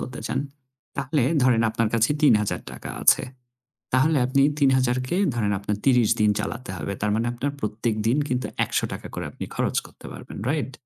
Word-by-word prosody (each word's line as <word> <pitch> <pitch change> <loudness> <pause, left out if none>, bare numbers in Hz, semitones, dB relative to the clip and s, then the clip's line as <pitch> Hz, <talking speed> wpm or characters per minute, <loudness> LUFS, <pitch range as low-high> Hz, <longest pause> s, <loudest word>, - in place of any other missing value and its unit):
করতে 125 0 -6
চান, 130 - -1 0.6
তাহলে 140 0 0 0.2
ধরেন 120 -3 +4
আপনার 115 0 0
কাছে 115 +4 +3
৳৩,০০০ 105 -8 +1
আছে। - - +5 0.7
তাহলে 140 +3 +3
আপনি 135 +2 +2 0.2
৩,০০০ 130 -3 +3
কে 175 - 0 0.2
ধরেন 105 -3 0
আপনার 105 +1 -2
৩০ 125 -5 +4
দিন 105 -1 +5
চালাতে 120 -3 -4
হবে। 90 +5 -4
তার 105 0 0
মানে 115 +2 0
আপনার 135 +4 -2
প্রত্যেকদিন 110 +2 0
কিন্তু 125 0 -1 0.2
৳১০০ - - -3
করে - - -4
আপনি - - -7
খরচ - - -1
করতে - - -14
পারবেন। - - -10
রাইট? 145 -3 -2
120 Hz, 165 wpm, -24 LUFS, 110-135 Hz, 0.7 s, আছে